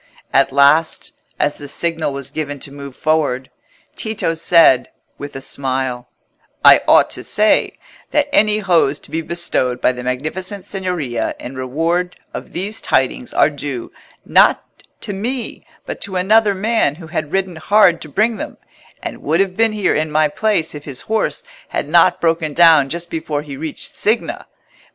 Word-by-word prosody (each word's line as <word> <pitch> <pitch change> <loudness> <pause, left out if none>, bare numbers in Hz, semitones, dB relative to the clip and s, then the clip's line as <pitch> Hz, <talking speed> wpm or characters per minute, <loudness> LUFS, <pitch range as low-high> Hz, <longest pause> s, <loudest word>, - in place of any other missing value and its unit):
At 135 0 +3
last, 140 +4 +3 0.3
as 145 0 0
the 145 - -8
signal 165 +1 -1
was 140 -1 -6
given 145 -2 -4
to 140 - -2
move 140 -2 -9
forward, 145 -5 0 0.4
Tito 220 -6 -1
said, 165 -5 +4 0.3
with 145 -1 -8
a 135 - -6
smile— 130 -2 -3 0.6
"I - - +9
ought - - +5
to - - -6
say, 215 +1 +2 0.3
that 295 -1 +1
any 210 0 +4
hose 170 -8 +2
to - - -15
be 165 - -1
bestowed 155 -7 -1
by - - +3
the 125 -1 -7
Magnificent 155 +10 -4
Signoria 175 - -3
in 125 - -8
reward 165 +8 -1 0.2
of - - -7
these 200 +5 -4
tidings 240 - 0
are - - +3
due, 140 -4 -6 0.3
not - - +4 0.4
to 205 - -4
me, 235 +5 -5 0.2
but - - -6
to 195 -2 -3
another 205 +3 +3
man 210 -7 +1
who 165 +1 -11
had 155 -2 -4
ridden 190 -3 -1
hard 190 0 +4
to 155 - -9
bring 215 +8 +1
them, - - -7 0.5
and - - -6
would - - 0
have 195 -2 +1
been 225 0 +2
here 210 -3 +1
in 155 +1 -1
my 155 0 +2
place 190 0 -1
if 145 -1 -9
his 135 -3 -6
horse 220 0 -2 0.2
had - - -3
not 175 +3 +4
broken 165 -3 0
down 160 -5 +6
just 170 +2 -5
before 155 -2 -3
he 145 -2 -8
reached 155 +2 -6
Signa. 330 - -1
160 Hz, 170 wpm, -18 LUFS, 140-195 Hz, 0.6 s, I